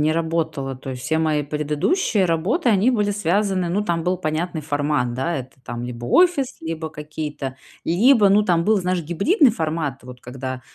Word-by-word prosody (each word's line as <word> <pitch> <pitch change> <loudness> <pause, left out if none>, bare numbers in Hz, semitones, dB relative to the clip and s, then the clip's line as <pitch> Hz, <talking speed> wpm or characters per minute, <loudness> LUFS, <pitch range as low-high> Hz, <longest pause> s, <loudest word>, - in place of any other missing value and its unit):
не 150 +1 +3
работала. 160 -5 -2
То 130 +1 -8
есть 125 -1 -7
все 160 +5 0
мои 155 -2 +1
предыдущие 150 - 0
работы, 180 - +1
они 215 +4 +4
были 210 -4 +1
связаны, 190 -1 0
ну, 195 +4 0
там 170 -3 -1
был 180 +2 0
понятный 160 0 -2
формат, 145 -4 -1
да, 165 +7 -1
это, 130 0 -7
там, 120 +1 -5
либо 120 -1 -6
офис, 320 -8 +3
либо 160 0 -4
какие-то, 150 -3 -6 0.3
либо, 210 +4 +5
ну, 205 +2 +5
там 170 -4 +1
был, 215 +1 +3
знаешь, 180 0 0
гибридный 215 - +3
формат, 155 - -2
вот, 125 0 -11
когда, 130 +1 -6
160 Hz, 180 wpm, -22 LUFS, 145-195 Hz, 0.3 s, либо